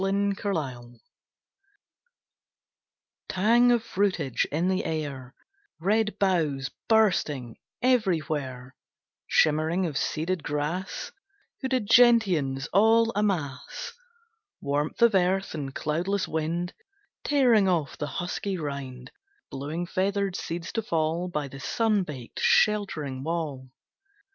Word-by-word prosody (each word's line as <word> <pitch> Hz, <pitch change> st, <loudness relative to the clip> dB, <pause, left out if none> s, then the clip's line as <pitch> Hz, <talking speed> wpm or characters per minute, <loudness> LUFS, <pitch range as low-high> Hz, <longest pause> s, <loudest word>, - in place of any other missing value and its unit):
Late 200 Hz, +1 st, +1 dB
September 130 Hz, -12 st, -4 dB, 2.3 s
Tang 235 Hz, +6 st, +4 dB
of 235 Hz, -2 st, +2 dB
fruitage 185 Hz, -, 0 dB
in 165 Hz, +5 st, 0 dB
the 190 Hz, 0 st, +1 dB
air; 140 Hz, -5 st, -4 dB, 0.4 s
Red 210 Hz, +5 st, +1 dB
boughs 155 Hz, -9 st, 0 dB, 0.2 s
bursting 155 Hz, -, +2 dB, 0.3 s
everywhere; 155 Hz, -, 0 dB, 0.5 s
Shimmering 160 Hz, +4 st, +2 dB
of 150 Hz, -5 st, -2 dB
seeded 170 Hz, +3 st, -1 dB
grass; 150 Hz, +6 st, -3 dB, 0.5 s
Hooded 260 Hz, -4 st, 0 dB
gentians 190 Hz, -, +4 dB
all 225 Hz, +3 st, +5 dB
a'mass. 175 Hz, -11 st, -2 dB, 0.7 s
Warmth 145 Hz, +9 st, -1 dB
of 235 Hz, -2 st, +6 dB
earth, 190 Hz, +1 st, +1 dB
and 140 Hz, -3 st, -5 dB
cloudless 180 Hz, +6 st, -1 dB
wind 165 Hz, +3 st, -2 dB, 0.5 s
Tearing 245 Hz, -8 st, +4 dB
off 165 Hz, -6 st, 0 dB
the 150 Hz, -, -4 dB
husky 185 Hz, +4 st, -3 dB
rind, 135 Hz, -5 st, -6 dB, 0.4 s
Blowing 150 Hz, +6 st, -4 dB
feathered 195 Hz, +1 st, -1 dB
seeds 170 Hz, 0 st, -5 dB
to 225 Hz, -, -1 dB
fall 165 Hz, -2 st, -1 dB
By 150 Hz, -5 st, -3 dB
the 135 Hz, 0 st, -10 dB
sun 215 Hz, +6 st, +1 dB
baked, 135 Hz, -9 st, -7 dB
sheltering 155 Hz, -11 st, +2 dB
wall. 150 Hz, -4 st, -3 dB
170 Hz, 105 wpm, -27 LUFS, 145-200 Hz, 2.3 s, of